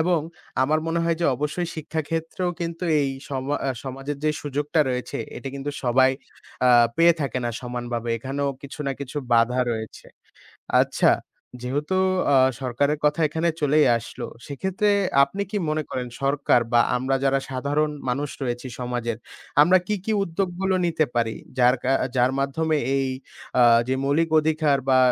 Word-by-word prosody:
এবং 170 0 +2 0.4
আমার 155 +3 +2
মনে 170 +1 0
হয় 165 0 +1
যে, 170 - +2
অবশ্যই 150 +5 -2
শিক্ষাক্ষেত্রেও 160 +3 -3
কিন্তু 170 +1 -3 0.2
এই 140 -1 0 0.2
সমা 135 +1 -2
আ - - 0 0.2
সমাজের 135 +2 -5
যেই 155 - +2
সুযোগটা 145 +2 0
রয়েছে, 125 0 -3 0.2
এটা 125 +2 -6
কিন্তু 140 +1 -4
সবাই 130 +2 +4 0.6
আ - - +6 0.3
পেয়ে 170 0 +6
থাকে 135 -3 -1
না 120 - 0
সমান 125 -1 -5
ভাবে। 115 0 -3
এখানেও 140 +4 -2
কিছু 140 +2 -9
না 135 - 0
কিছু 140 +1 -7 0.2
বাধা 120 +2 +3
রয়েছে। 110 -1 -6 0.8
আচ্ছা - - +2 0.5
যেহেতু 145 +8 -1 0.4
আ - - +6 0.3
সরকারের 140 +4 0
কথা 150 +2 +2
এখানে 160 +3 0
চলেই 150 0 +4
আসলো। 115 - -7 0.2
সেক্ষেত্রে 190 +8 -1 0.4
আপনি 195 +8 -4
কি 210 - -3
মনে 155 0 0
করেন? 125 -1 -3
সরকার 140 -3 +3
বা 120 - +6 0.2
আমরা 130 +2 0
যারা 135 0 +2
সাধারণ 145 +4 0 0.2
মানুষ 140 +3 -1
রয়েছি 120 0 -3
সমাজের 120 -2 -2 0.5
আমরা 185 +4 +5
কী, 210 - 0
কী 220 - 0
উদ্যোগগুলো 190 +1 -1
নিতে 160 -2 +2
পারি। 115 -2 0 0.2
যার 125 +1 +5
কা 130 - +1 0.2
যার 125 +1 +3
মাধ্যমে 155 +3 0 0.2
এই 135 -1 0 0.5
আ - - +7 0.3
যে 130 - +2
মৌলিক 150 +4 +2
অধিকার 155 -2 +2
বা 130 -1 +5
140 Hz, 160 wpm, -24 LUFS, 130-160 Hz, 0.8 s, আ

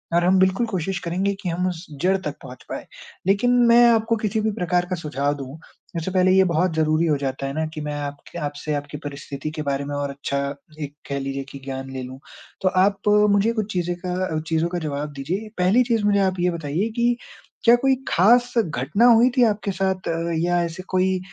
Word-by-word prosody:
और 175 - +4
हम 185 +1 +4
बिल्कुल 190 +5 +3
कोशिश 190 -2 -2
करेंगे 185 +4 -1
कि 180 - -2
हम 180 +2 -1
उस 175 0 -7 0.2
जड़ 190 +2 +3
तक 150 -1 -3
पहुँच 130 -1 -11
पाएँ। - - -5 0.4
लेकिन 200 +6 +3 0.2
मैं 240 +1 +7
आपको 225 0 +2
किसी 215 0 -1
भी 220 0 0
प्रकार 180 -3 0
का 185 - 0
सुझाव 145 -3 -1
दूँ, 135 +2 -8 0.4
उससे 165 +3 -3
पहले 185 0 +3
ये 190 0 +6
बहुत 175 0 +1
ज़रूरी 155 +1 +2
हो 150 -2 +2
जाता 135 0 -3
है 135 - -4
ना 160 +1 -1
कि 155 - -5
मैं 150 0 -4
आपके 145 +4 -7
आपसे 145 0 -3
आपकी 145 +1 -5
परिस्थिति 140 +1 -6
के 155 - -5
बारे 140 -1 -2
में 145 0 -4
और 145 0 -2
अच्छा 140 0 -3 0.4
एक 145 -1 -5 0.2
कह 140 - -1
लीजिए 135 0 -3
कि 140 - -9
ज्ञान 135 0 -5
ले 130 -1 -5
लूँ। 130 +1 -9 0.4
तो 190 - +3
आप 195 +2 +1 0.2
मुझे 205 +3 +3
कुछ 215 -2 -2
चीज़ें 175 -1 -1
का 180 -3 -1
चीज़ों 160 +1 +1
का 175 - -3
जवाब 150 -1 -4
दीजिए, 185 +11 -4
पहली 190 +8 +4
चीज़ 230 -3 0
मुझे 205 -1 +3
आप 190 -1 +1
ये 180 +1 +2
बताइए 165 +6 -2
कि 240 0 +2 0.5
क्या 235 0 +7
कोई 265 +2 +2
ख़ास 240 +7 +4
घटना 160 - +1
हुई 235 +2 +6
थी 245 - +6
आपके 210 -2 +1
साथ 190 -1 -1 0.3
या 175 +1 +1
ऐसे 170 +2 -5
कोई 185 0 +1
175 Hz, 215 wpm, -23 LUFS, 145-200 Hz, 0.5 s, मैं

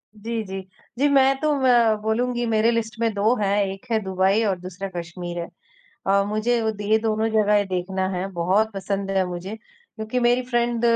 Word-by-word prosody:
जी, 225 +1 -4
जी। 190 -1 -6 0.4
जी, 285 - +3
मैं 270 -1 +4
तो 305 0 +1
म 235 -4 +5
बोलूँगी 240 +3 0
मेरे 225 0 +2
लिस्ट 225 -2 -2
में 230 -2 +1
2 210 +4 +2
हैं। 200 0 +1
एक 195 +3 -7
है 220 - +3
दुबई 190 +3 +2
और 195 -4 0
दूसरा 185 +2 -6
कश्मीर 175 0 -5
है। 170 - -4 0.6
अ, 200 +1 +4
मुझे 215 +3 0
अद 220 -2 -2
ये 210 +2 +3
दोनों 220 0 0
जगहें 210 -2 +3
देखना 185 +1 -2
है। 185 +2 -2
बहुत 190 +6 +1
पसंद 195 0 -3
है 190 -1 +2
मुझे 180 +4 -6
क्योंकि 250 - -7
मेरी 245 +1 +3
फ्रेंड 240 -1 0
215 Hz, 185 wpm, -23 LUFS, 195-230 Hz, 0.6 s, म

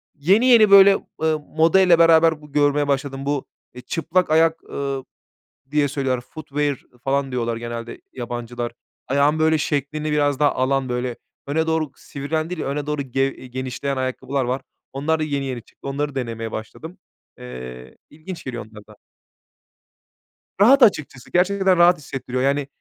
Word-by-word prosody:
yeni 190 - +3
yeni 225 -5 +6
böyle, 195 0 +8 0.2
ııı, 160 -1 +1
modayla 170 +3 +3
beraber 165 0 +6
görmeye 145 -1 0
başladım. 135 -1 -2
Bu, 145 -1 -1 0.3
eee, 125 - -10
çıplak 165 +6 -1
ayak, 160 +1 +3
eee, 140 -1 -3 0.7
diye 150 -1 +2
söylüyorlar 135 -3 -1
foodware 145 0 -3 0.3
falan 135 0 0
diyorlar 115 -2 -2
genelde 120 0 -7
yabancılar. 120 -1 -5 0.4
Ayağın 140 +3 +2
böyle 160 0 +3
şeklini 150 +1 -2
biraz 145 -2 +1
daha 145 -1 +4
alan 130 0 0
böyle 125 0 -2 0.3
öne 160 +3 0
doğru 160 -3 0
sivrilen 155 +3 -4
değil 180 -3 -4
öne 145 +1 -3
doğru 150 -1 -2
ge 135 0 0
genişleyen 130 +1 -5
ayakkabılar 130 +1 -2
var. 130 +2 -2 0.3
Onlar 155 +4 0
da 155 - 0
yeni 140 -2 -2
yeni 125 -3 -4
çıktı - - -13
onları 140 0 -3
denemeye 115 -3 -4
başladım. 160 - -8 0.4
Eee, 60 0 -9
ilginç 160 +3 -9
geliyor 120 -4 -6
onlar 105 -1 -15
da. 105 - -17 1.6
Rahat, 260 +6 +7
açıkçası 155 - +1
gerçekten 190 +1 +2
rahat 175 +1 +6
hissettiriyor. 130 -3 -5
Yani 140 0 +1
140 Hz, 145 wpm, -22 LUFS, 130-160 Hz, 1.6 s, böyle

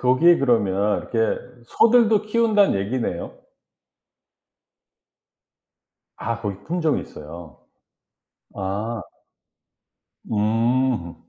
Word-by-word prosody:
거기에 130 +8 +4
그러면 105 -5 +1
이렇게 115 -1 +1 0.3
소들도 225 - +4
키운다는 215 - +2
얘기네요. 100 -3 -3 2.8
아 115 +1 -3
고기 100 -3 -5
품종이 160 -2 0
있어요. 75 -1 -11 1.0
아. 105 +4 -3 1.3
음. 115 -2 0
115 Hz, 165 characters per minute, -22 LUFS, 100-165 Hz, 2.8 s, 거기에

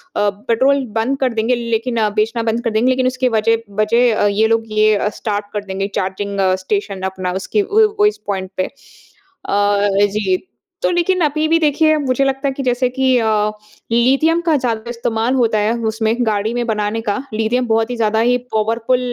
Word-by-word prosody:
अ, 205 - +2 0.2
petrol 265 +4 +2
बंद 250 +5 0
कर 255 -3 0
देंगे, 230 +2 +1
लेकिन 235 0 -2 0.2
बेचना 225 +2 0
बंद 230 +1 -1
कर 230 - 0
देंगे, 220 +4 +2
लेकिन 255 0 +1
उसकी 255 0 0
वजह 225 +1 +2 0.2
वजह 230 +2 +3
अ, - - +4
ये 210 +2 +2
लोग 225 0 +1 0.2
ये 215 0 +5
अ, 205 +1 0
स्टार्ट 205 -1 -2
कर 210 -1 -3
देंगे, 195 0 -3
चार्जिंग 200 +1 -3 0.3
स्टेशन 200 -2 -2
अपना, 185 -1 -4
उसकी 210 +2 0
वो 435 - +3 0.2
उस 420 - -1
पॉइंट 190 -2 -3
पे। 185 - +1
अ, 205 - -3 0.3
जी। 190 -3 +1 0.4
तो - - +2
लेकिन 355 +1 +1
अभी 305 0 +1
भी 330 +1 +3
देखिए, 310 0 +3
मुझे 275 -2 0
लगता 270 +1 -1
है - - 0
कि 275 - -3
जैसे 250 0 +1
कि 260 0 +2
अ, 225 -2 +1 0.6
लिथियम 270 +8 +3
का 330 -2 +1
ज़्यादा 235 -3 -3
इस्तेमाल 235 0 -1
होता 230 -4 +2
है 210 +2 +1
उसमें, 220 0 0
गाड़ी 215 +1 0
में 240 0 -1
बनाने 215 0 -1
का। 200 - 0 0.2
लिथियम 225 +3 0
बहुत 225 0 +1
ही - - -2
ज़्यादा 220 -1 +1
ही 245 +2 +3 0.2
पावरफुल 225 +3 +1
230 Hz, 190 wpm, -17 LUFS, 215-255 Hz, 0.6 s, ये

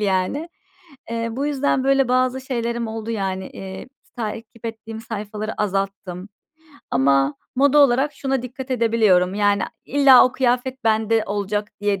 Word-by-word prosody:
yani. 200 - 0 0.6
Eee, 230 0 -2
bu 270 +5 -2
yüzden 285 -2 0
böyle 270 -1 +3
bazı 255 +1 +1
şeylerim 235 -3 -2
oldu 220 0 -5
yani. 190 -3 -2
Eee, 190 +3 -8 0.2
s - - -33
takip 225 0 -6
ettiğim 225 0 -7
sayfaları 215 -1 -5
azalttım 195 -2 -3 0.6
ama 135 +1 +3 0.2
moda 285 +2 +4
olarak 280 +1 +4
şuna 270 -2 -2
dikkat 255 +1 -8
edebiliyorum. 220 -7 +3
Yani 205 0 +2 0.2
illa 275 -2 +7
o 255 - -5
kıyafet 255 0 -1
bende 220 0 +2
olacak 205 +1 -2
diye 205 -1 0
225 Hz, 140 wpm, -21 LUFS, 205-255 Hz, 0.6 s, illa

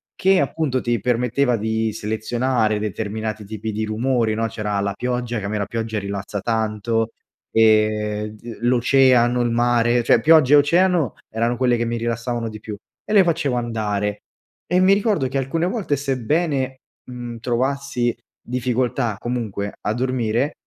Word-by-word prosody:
che 190 0 +3
appunto 140 -6 -1
ti 120 -2 0
permetteva 125 +2 +1
di 110 0 -1
selezionare 110 +1 0
determinati 110 +1 -4
tipi 110 +1 -5
di 110 +1 -2
rumori, 115 +1 0
no, 115 +1 -1
c’era 105 -2 -3
la 100 - -1
pioggia, 125 0 -2
che 100 - -6
a - - -1
me 105 +1 -2
la 100 - -1
pioggia 110 +1 -3
rilassa 100 0 -4
tanto, 110 +1 -1 0.4
ehm, 110 -1 +2
d 115 +2 -10
l’oceano, 125 0 +4
il 120 - +1
mare, 120 0 +2
cioè - - +4
pioggia 150 0 +6
e - - +8
oceano 170 - +3 0.2
erano 115 +2 0
quelle 125 -1 +2
che 120 - -1
mi 115 - -2
rilassavano 115 0 -2
di 110 0 -9
più, 105 -1 -7 0.3
e - - -3
le 200 -3 +7
facevo 160 -6 0
andare, 105 -3 -2 0.5
e 180 - +2
mi 185 +1 +5
ricordo 200 - +1
che 130 +2 -3
alcune 160 +6 -1
volte, 185 -7 -1
sebbene, 135 0 -1 0.3
mhmm, 120 -2 -7
trovassi 125 0 -1 0.3
difficoltà 125 -2 -1
comunque 110 -5 -3
a 105 - -1
dormire, 125 +2 0
120 Hz, 155 wpm, -21 LUFS, 110-130 Hz, 0.5 s, e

